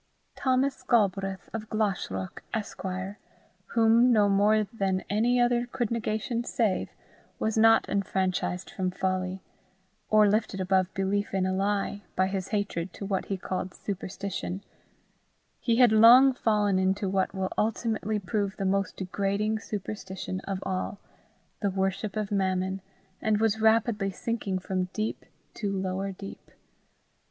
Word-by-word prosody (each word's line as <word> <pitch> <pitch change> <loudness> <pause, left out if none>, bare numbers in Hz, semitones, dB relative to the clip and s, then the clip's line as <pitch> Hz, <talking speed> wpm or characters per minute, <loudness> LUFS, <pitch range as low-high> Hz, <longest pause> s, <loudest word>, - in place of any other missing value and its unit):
Thomas 265 +1 +1
Galbraith, 195 -4 +1
of 220 -1 -5
Glashruach, 190 - -2
Esquire, 190 -2 -4 0.6
whom 230 +2 +5
no 210 -3 +5
more 205 +2 +4
than 195 -3 -1
any 235 +4 +2
other 240 0 +2
could 240 -3 -2
negation 230 0 -1
save, 220 -5 0 0.5
was 220 - -1
not 225 0 +5
enfranchised 190 -2 -1
from 185 -1 -1
folly, 185 0 -2 0.7
or 215 -1 +6
lifted 210 -1 0
above 185 0 +2
belief 195 +1 -1
in 190 -1 +1
a 185 - 0
lie, 200 +1 -1
by 185 - +3
his 190 -1 -3
hatred 200 -4 -2
to 200 - -7
what 195 -1 -1
he 195 - -2
called 185 0 -4
superstition: 195 -1 -5 1.0
he 235 - +1
had 245 -1 +6
long 240 +5 +8
fallen 210 -5 +2
into 190 +1 +1
what 190 +1 0
will 190 -1 -2
ultimately 220 -1 0
prove 200 0 -2
the 195 - -2
most 195 0 0
degrading 200 +3 -1
superstition 195 -3 -5
of 195 -1 -1
all 185 +1 -3 0.6
the 200 - +1
worship 195 +2 -1
of 215 -2 -2
Mammon, 190 -1 0 0.4
and 215 -1 +2
was 220 0 +1
rapidly 220 -2 +3
sinking 200 -1 -2
from 185 0 -2
deep 215 0 -3 0.3
to 205 -3 -3
lower 190 0 -2
deep. 195 +1 -10
200 Hz, 135 wpm, -28 LUFS, 190-220 Hz, 1.0 s, long